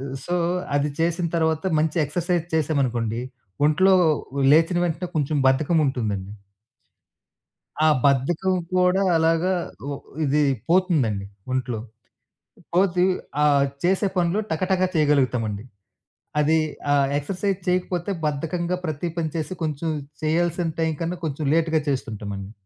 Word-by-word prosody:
ఆహ్, 135 0 -6
సో, 175 - -2 0.4
అది 145 +1 +1
చేసిన 170 +1 +1
తరువాత 160 0 0 0.2
మంచి 160 +1 0
ఎక్సర్సైజ్ 170 +2 -1
చేసామనుకోండి, 125 -7 0 0.5
ఒంట్లో 185 +5 +4 0.6
లేచిన 165 +3 +4
వెంటనే 175 +1 -2
కొంచెం 150 0 0
బద్ధకముంటుందండి. 130 - 0 1.5
ఆ - - +6 0.2
బద్ధకం 155 +7 +2 0.2
కూడా 180 +1 +3
అలాగా 165 +3 +2 0.4
ఓ - - -2 0.3
ఇది 150 +2 +2 0.3
పోతుందండి 150 - +2 0.3
ఒంట్లో. 125 -3 -2 0.9
పోతే 180 -1 +3 0.4
ఆహ్, 140 -2 +4 0.2
చేసే 190 +3 +2
పనులు 175 +3 +1
టకటక 185 +3 +1
చేయగలుగుతామండి. 125 -8 +1 0.8
అది 155 +2 +3 0.3
ఆ - - +5 0.2
ఎక్సర్సైజ్ 190 +5 -2
చేయకపోతే 180 +1 0
బద్ధకంగా 165 +4 -1
ప్రతి 155 +2 -3
పని 160 -2 -1
చేసి 160 +2 -3
కొంచెం 155 +1 -2 0.3
చేయాల్సిన 170 +2 +1
టైంకన్న 165 +2 -1
కొంచెం 150 0 -3
లేట్‌గా 160 -1 +2
చేస్తుంటామండి. 105 -6 -4
160 Hz, 110 wpm, -23 LUFS, 140-175 Hz, 1.5 s, ఆ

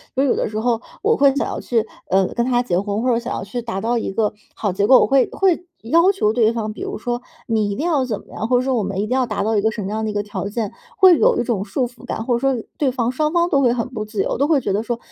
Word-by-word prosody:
所 265 - +2
以 - - +2
有 - - +3
的 - - 0
时 215 - -5
候 230 +1 0 0.2
我 450 +2 +2
会 275 -1 +4
想 285 - 0
要 - - -4
去， 230 -3 0 0.2
呃， 190 +1 +3
跟 235 - -1
他 245 -1 +2
结 180 -7 0
婚， 205 +2 -2
或 255 - +1
者 235 - +2
想 240 +2 -5
要 - - -4
去 215 +5 -5
达 230 -5 -4
到 235 +3 0
一 230 - -2
个 215 +1 0 0.2
好 205 - -1
结 200 +3 0
果， 260 - +8
我 - - +4
会 270 -2 +3
会 360 -2 +1 0.2
要 335 - +4
求 215 - +1
对 225 -2 +3
方， 220 -2 -3
比 - - -10
如 - - -4
说 240 +2 -3 0.3
你 220 -3 +1
一 200 - -2
定 295 - -3
要 310 -6 +2
怎 215 -5 -3
么 - - -23
样， 220 - -3
或 250 - +4
者 250 - +1
说 265 0 0
我 225 - 0
们 195 0 -4
一 210 - -1
定 - - -10
要 255 0 +2
达 215 -3 -2
到 220 +2 0
一 - - +2
个 220 - +2
什 215 - -5
么 190 - -4
样 215 +1 -2
的 - - -1
一 - - -7
个 205 0 -1
条 205 -1 -5
件， 210 0 -3 0.3
会 370 -4 +7
有 - - +3
一 - - +1
种 225 -5 -1
束 245 +5 -1
缚 240 0 -18
感， 225 - -4
或 245 - +1
者 - - -1
说 265 -3 0
对 285 - +2
方 245 -2 -1
双 300 +4 0
方 345 0 +2
都 280 -6 +3
会 245 -3 +3
很 235 -2 -2
不 225 -5 -4
自 210 -2 -2
由， - - -2
都 280 - +2
会 310 -3 +3
觉 205 - -2
得 205 - +1
说， 235 +1 -2
235 Hz, 355 characters per minute, -20 LUFS, 215-265 Hz, 0.3 s, 果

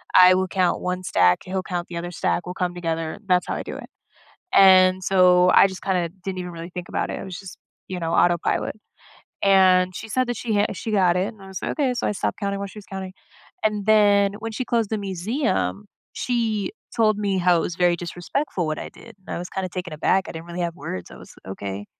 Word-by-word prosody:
I 185 0 +9
will 190 0 0
count 185 -1 0
one 180 0 -2
stack; 90 - +3
he'll 185 0 -3
count 175 -2 -4
the 170 - -5
other 175 +1 -5
stack. 175 0 -1
We'll 180 - -5
come 180 -1 -2
together; 165 -2 -3
that's 180 -1 +2
how - - -2
I - - -4
do - - -7
it. - - -10 0.6
And 185 -1 +6
so 180 -1 +5
I - - +8
just 190 - -9
kinda 180 -3 0 0.2
didn't 190 -1 -4
even 180 -1 -5
really 170 +1 -8
think 180 0 -7
about - - -1
it. - - -4
I - - -7
was 185 -2 -7
just, 195 -3 -10 0.3
you 185 - -4
know, 165 0 -2
autopilot. 175 +3 +1 0.7
And 185 -2 +5
she - - -7
said 255 +3 0
that 245 - -2
she 225 -3 -2
ha 205 - +3
she 220 - -5
got 185 -4 +4
it, 185 +2 0
and 215 -3 -17
I 195 - -11
was 190 -2 -6
like, - - -2
"Okay." 275 -5 0
So - - -2
I - - +1
stopped 195 - -2
counting 200 0 -2
while 200 - -4
she 210 - -11
was 205 - -12
counting. 190 -1 -6 0.5
And 210 -2 0
then 205 -2 +4
when 225 +1 -5
she 255 - -3
closed 230 -3 0
the 220 - -1
museum, 205 - -2 0.3
she 225 - -1 0.2
told 215 -2 +3
me 200 -2 0
how 180 -1 +4
it - - +1
was 170 - -3
very 175 -1 +3
disrespectful 175 - -3
what 155 0 -2
I - - -6
did, 230 -3 -15
and 190 - -8
I - - -3
was 175 +1 -7
kinda 190 -1 -3
taken 180 -1 -5
aback. 190 +5 +1
I - - -6
didn't 165 +1 -8
really 175 +1 -6
have 170 -1 -2
words. 90 - -6
I - - -11
was, - - -14
"Okay. 100 +1 -6
185 Hz, 245 wpm, -23 LUFS, 175-200 Hz, 0.7 s, I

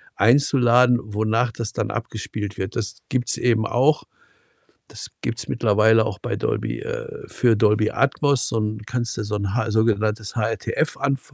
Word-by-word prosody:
einzuladen, 125 0 +4
wonach 110 +3 0
das 115 -1 -5
dann - - -2
abgespielt 110 -2 -5
wird. 95 - -4
Das 110 -5 -3
gibt's 125 -1 -1
eben 115 -3 +1
auch. 140 +5 +2 0.8
Das - - -9
gibt's 115 +1 -4
mittlerweile 110 -1 +3
auch 110 -3 -4
bei - - -3
Dolby - - -2
äh, - - -6
für 120 -2 +2
Dolby 105 0 +2
Atmos, 140 -1 +1
so 115 - -1
'n 105 0 -3
kannst 120 -2 -3
du 110 - -2
so 105 0 -3
'n 100 -1 -2
Ha 120 -1 0
sogenanntes 110 0 0
HRTF 115 +7 -1
anf 135 -2 -2
115 Hz, 160 wpm, -22 LUFS, 105-125 Hz, 0.8 s, einzuladen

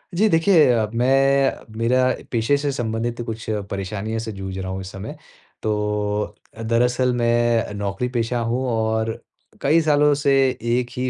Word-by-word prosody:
जी 215 +5 +4
देखिए 165 -1 +5
अ, 110 -3 +1
मैं 135 +3 +2
मेरा 125 +3 +2 0.3
पेशे 115 +4 +2
से 145 0 -1
संबंधित 120 -1 -3
कुछ 110 -1 -6 0.3
परेशानियों 100 +3 -3
से 110 0 -5
जूझ 95 -2 -6
रहा 95 0 -4
हूँ 95 0 -4
इस 95 - -7
समय। 100 +3 -7 0.5
तो 105 -1 -1 0.2
अ, 110 - -10
दरअसल 125 +2 +2
मैं 120 -1 +2
अ, - - -8
नौकरी 100 +3 -2
पेशा 120 +1 0
हूँ 125 +3 -1
और 110 -1 0 0.5
कई 155 +4 +4
सालों 150 -1 +4
से 140 -1 +1 0.4
1 125 0 +1
ही 130 0 0
115 Hz, 160 wpm, -22 LUFS, 110-130 Hz, 0.5 s, देखिए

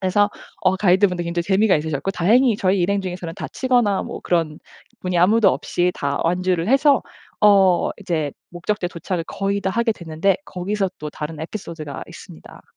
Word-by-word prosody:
그래서 205 +2 +2 0.3
어 190 0 +3
가이드분들도 185 -2 +2
굉장히 170 0 -1
재미가 195 +2 +3
있으셨고 150 +3 -2
다행히 225 +6 +3
저희 190 -1 +1
일행 200 +3 +1
중에서는 180 -3 -5
다치거나 245 -7 0
뭐 - - -7
그런 165 -3 0 0.4
분이 180 -1 -2
아무도 210 +5 +5
없이 175 +7 -1
다 140 0 -2
완주를 180 0 0
해서 275 +1 +4 0.4
어 195 -4 +5
이제 160 -7 -2 0.2
목적지에 175 +2 -2
도착을 175 0 -4
거의 200 0 -2
다 190 - -1
하게 230 +2 +1
됐는데 170 +2 0
거기서 195 - -2
또 150 - -5
다른 150 +1 -6
에피소드가 160 -5 -6
있습니다. - - -13
185 Hz, 395 characters per minute, -21 LUFS, 170-205 Hz, 0.4 s, 아무도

